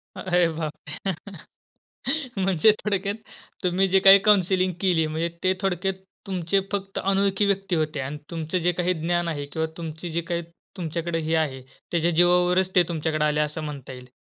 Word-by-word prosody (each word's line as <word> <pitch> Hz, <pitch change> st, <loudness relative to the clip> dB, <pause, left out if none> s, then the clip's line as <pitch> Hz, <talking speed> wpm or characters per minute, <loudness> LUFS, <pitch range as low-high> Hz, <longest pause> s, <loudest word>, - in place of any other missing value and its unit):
अरे 175 Hz, -1 st, +2 dB
बापरे! 155 Hz, +3 st, -4 dB, 1.3 s
म्हणजे 190 Hz, +1 st, +4 dB
थोडक्यात, 200 Hz, 0 st, -1 dB, 0.5 s
तुम्ही 185 Hz, +2 st, +2 dB
जे 190 Hz, +1 st, +4 dB
काही 195 Hz, +1 st, +9 dB
काउंसलिंग 185 Hz, -2 st, +3 dB
केली, 175 Hz, -5 st, +3 dB
म्हणजे 160 Hz, +2 st, -2 dB
ते 185 Hz, 0 st, +3 dB
थोडक्यात 190 Hz, 0 st, 0 dB, 0.3 s
तुमचे 185 Hz, 0 st, 0 dB
फक्त 195 Hz, -1 st, -3 dB
अनोळखी 195 Hz, +1 st, +2 dB
व्यक्ती 195 Hz, -2 st, 0 dB
होते 155 Hz, -2 st, -1 dB
अन् 135 Hz, +2 st, -4 dB
तुमचं 165 Hz, +1 st, -2 dB
जे 180 Hz, -, +5 dB
काही 180 Hz, +1 st, 0 dB
ज्ञान 175 Hz, +1 st, 0 dB
आहे 145 Hz, -3 st, -3 dB
किंवा 160 Hz, +3 st, -3 dB
तुमची 165 Hz, +1 st, -6 dB
जी 170 Hz, +1 st, -1 dB
काही 170 Hz, 0 st, -3 dB, 0.4 s
तुमच्याकडे 170 Hz, -1 st, -2 dB
हे 160 Hz, +1 st, 0 dB
आहे, 145 Hz, -5 st, -1 dB, 0.3 s
त्याच्या 170 Hz, 0 st, +2 dB
जीवावरच 180 Hz, +2 st, +3 dB
ते 180 Hz, -, +7 dB
तुमच्याकडे 155 Hz, -2 st, 0 dB
आले, 150 Hz, 0 st, +1 dB
असं 150 Hz, +1 st, -3 dB
म्हणता 140 Hz, -3 st, -7 dB
येईल. 125 Hz, 0 st, -11 dB
175 Hz, 160 wpm, -24 LUFS, 160-190 Hz, 1.3 s, काही